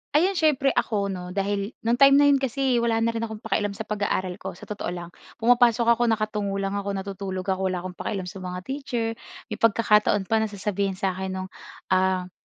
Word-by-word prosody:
Ayun 360 +6 +4
siyempre 280 -4 +3
ako 200 -3 0
'no, 180 0 -6
dahil 200 +2 -1
no'ng 235 +3 +1
time 275 0 +8
na 285 - +6
'yon 275 - +4
kasi 265 -1 +1
wala 230 -1 +1
na 230 - +2
rin 230 - -3
akong 220 -1 -9
pakialam 205 -1 -1
sa 220 - -4
pag-aaral 200 -3 -1
ko - - -6
sa - - -15
totoo 210 - -5
lang. 175 -1 -5 0.3
Pumapasok 240 -1 +5
ako 240 +1 +2
nakatungo 210 -3 -1
lang 195 0 -1
ako, 200 0 -3
natutulog 195 -1 -4
ako, 190 0 0
wala 180 -1 -2
akong 180 -2 -8
pakialam 195 -4 -3
sa 185 +2 -8
mga 180 0 -5
teacher. 255 -2 -3 0.4
May - - -4
pagkakataon 210 -2 +3
pa 220 +4 +1
na 220 - +1
sasabihin 200 -1 -2
sa'kin 190 0 -2
no'ng, 185 0 -5 0.4
ah, 185 -1 +2
205 Hz, 200 wpm, -25 LUFS, 190-230 Hz, 0.4 s, time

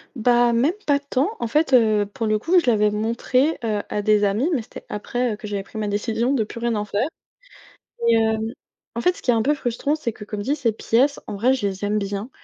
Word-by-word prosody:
Bah, 240 0 +3
même 250 +7 +3 0.2
pas 285 -1 +4
tant. 280 +2 -1
En 235 - 0
fait, 295 +4 +1
heu, 215 -4 +4
pour 205 +3 -5
le 215 0 +1
coup, 340 - +2
je 340 - +3
l'avais 210 -1 +3
montrée, 235 +7 0
heu, 210 -2 0
à 210 - -1
des 210 0 +3
amis, 210 - +1
mais 265 - +1
c'était 220 - -12
après, 240 +3 -2
heu, - - -4
que 215 - -11
j'avais 205 -2 -3
pris 200 - -11
ma 210 -1 -2
décision 225 +4 0
de 230 -6 +1
plus 230 - -9
rien 235 -1 0
en 210 0 -2
faire, 210 +7 -1 1.0
et 230 - +5
hem, 220 -1 +2 0.5
en 235 - -3
fait, 360 - +3
ce - - -12
qui - - +1
est - - +3
un 225 - +2
peu 280 +6 +2
frustrant, 280 +1 -1
c'est 245 -8 -3
que 210 - -9
comme 210 0 -5
dit, 275 +8 -1
ces 240 -6 0
pièces 255 +6 +1
en - - -5
vrai, 235 +6 +2
je 255 -6 -1
les 195 0 -3
aime 210 +1 +1
bien. 200 +3 -4
225 Hz, 255 wpm, -22 LUFS, 210-255 Hz, 1.0 s, et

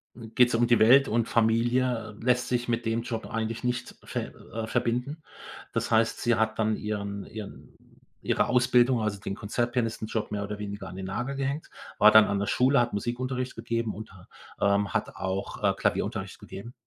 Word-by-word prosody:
Hm, 115 -2 -10
geht‘s 125 -1 +5
um 120 +1 +3
die 120 -2 +4
Welt 130 +5 +7
und 115 +1 +1
Familie, 115 -1 +1
äh, - - -11
lässt 125 0 +2
sich 120 -1 -1
mit 120 0 -1
dem 115 +1 0
Job 115 -1 -4
eigentlich 115 +1 -3
nicht 125 0 -2
ver - - -4 0.2
äh, 110 -1 -3
verbinden. 125 +6 -1 0.5
Das - - -1
heißt, 110 0 +2
sie 120 -2 +3
hat 110 0 0
dann 110 0 +2
ihren 100 -2 -4
ihren 105 -2 -10 0.5
ihre - - +2
Ausbildung, 125 -1 +3
also, 105 -2 -2
den 100 - -4
Konzertpianistenjob 115 -1 -2
mehr 100 -1 -2
oder 105 0 -5
weniger 100 -2 -6
an 90 - -9
den 95 0 -5
Nagel 125 +8 -3
gehängt, 140 +3 -3 0.3
war 105 - +9
dann 110 0 +8
an 100 -1 -1
der 100 - 0
Schule, 130 +1 +3
hat 120 -2 +1
Musikunterricht 125 +4 -2
gegeben 115 -2 -2
und 110 -1 -9
ha 95 - -16 0.3
ähm, 100 -1 +2
hat - - -2
auch, 95 +1 -3
äh, - - +4
Klavierunterricht - - -2
gegeben. 105 +6 -9
115 Hz, 190 wpm, -27 LUFS, 105-125 Hz, 0.5 s, war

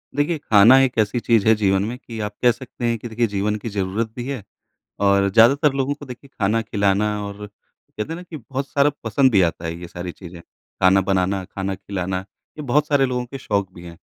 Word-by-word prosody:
देखिए, 150 +3 +1
खाना 115 -2 +6
एक 125 -3 -1
ऐसी 110 +3 +1
चीज़ 115 -3 +2
है 110 - +7
जीवन 95 -2 +1
में 120 +3 -5
कि 115 -4 -9
आप 105 - -11
कह 120 - +6
सकते 120 0 -7
हैं 115 0 +1
कि 120 - -7
देखिए 115 +1 0
जीवन 105 +1 -1
की 110 +2 -6
ज़रूरत 100 +2 -2
भी 120 - -5
है 135 -6 -4 0.6
और 100 0 +3
ज़्यादातर 135 +8 +5
लोगों 135 +1 0
को 145 - -11
देखिए 130 +1 -11
खाना 105 +3 +2
खिलाना 100 -1 +1 0.2
और 100 +1 -7
कहते 105 +1 -10
हैं - - -4
ना 175 - -9
कि 170 -3 -9
बहुत 135 +2 -5
सारा 140 +1 +3
पसंद 130 +4 +3
भी 100 -4 +4
आता 85 -1 -1
है, 80 - -3
ये 85 - -8
सारी 90 +1 -6
चीज़ें। 85 -1 -11
खाना 95 +2 0
बनाना, 95 0 0
खाना 95 +1 -4
खिलाना, 95 -1 -4 0.4
ये - - -5
बहुत 145 +3 +1
सारे 140 -2 +3
लोगों 125 -1 -2
के 135 +3 -8
शौक 100 -6 -2
भी 85 - -12
हैं। 85 -1 -11
110 Hz, 225 wpm, -21 LUFS, 95-130 Hz, 0.6 s, है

